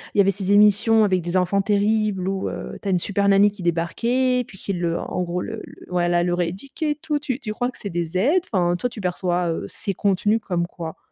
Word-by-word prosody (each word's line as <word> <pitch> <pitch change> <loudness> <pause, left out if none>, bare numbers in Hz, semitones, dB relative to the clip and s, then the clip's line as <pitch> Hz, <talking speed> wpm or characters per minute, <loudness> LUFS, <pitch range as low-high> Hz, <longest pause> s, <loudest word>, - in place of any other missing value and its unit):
y 205 - +6
avait 195 - +3
ces 195 0 -1
émissions 210 +2 +5
avec 185 -3 +2
des 175 +2 -1
enfants 190 +2 +2
terribles 205 -2 +1
où 195 0 -1
heu, - - -6
tu 200 - -5
as - - +1
une 180 - +2
super 200 +2 0
Nanny 200 +1 +6
qui 200 -2 -10
débarquait, 235 +10 +1
puis 195 - -14
qui 200 - -3
le, 170 -1 -1
en 180 - -3
gros, 175 +1 -2
le 225 +3 -5
le - - -15
voilà, 175 -1 +2
le 175 0 +1
rééduquait 195 - -2
et - - -1
tout. 300 0 -2
Tu 275 -3 -3
tu 230 -6 -5
crois 245 +3 -2
que - - -14
c'est 200 - -5
des 170 -1 -3
aides? 290 - +3
Enfin, 175 -2 +2
toi, 215 +8 -1
tu 235 -3 -9
perçois, 180 -1 0
heu, 165 - -2
ces 195 - -4
contenus 205 +3 +2
comme 175 -3 -1
quoi? 165 -2 -7
195 Hz, 245 wpm, -22 LUFS, 175-215 Hz, -, y